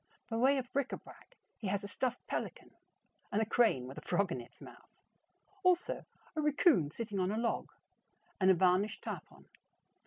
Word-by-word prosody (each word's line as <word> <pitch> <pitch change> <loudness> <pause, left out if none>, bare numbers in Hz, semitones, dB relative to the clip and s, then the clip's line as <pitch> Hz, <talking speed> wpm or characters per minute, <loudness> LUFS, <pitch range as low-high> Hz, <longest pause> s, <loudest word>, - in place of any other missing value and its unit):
By 225 - 0
way 265 +4 +4
of 255 -2 -4
bric 275 -1 0
a - - -2
brac, - - -16 0.2
he 210 - -3
has 200 +1 0
a - - -4
stuffed 250 +4 -2
pelican - - -4 0.6
and 205 - +2
a 220 - +2
crane 220 - +3
with 135 - -7
a - - -14
frog 180 +1 +1
in 130 - -2
its 120 - -16
mouth, - - -13 0.7
also 365 -2 +2 0.3
a 310 - +1
raccoon 295 - +4
sitting 210 +3 -4
on 185 0 +1
a 215 - -1
log, 230 0 -1 0.7
and 190 -1 +5
a 190 - +7
varnished 185 +3 +2
tarpon. - - -7
215 Hz, 185 wpm, -34 LUFS, 185-260 Hz, 0.7 s, a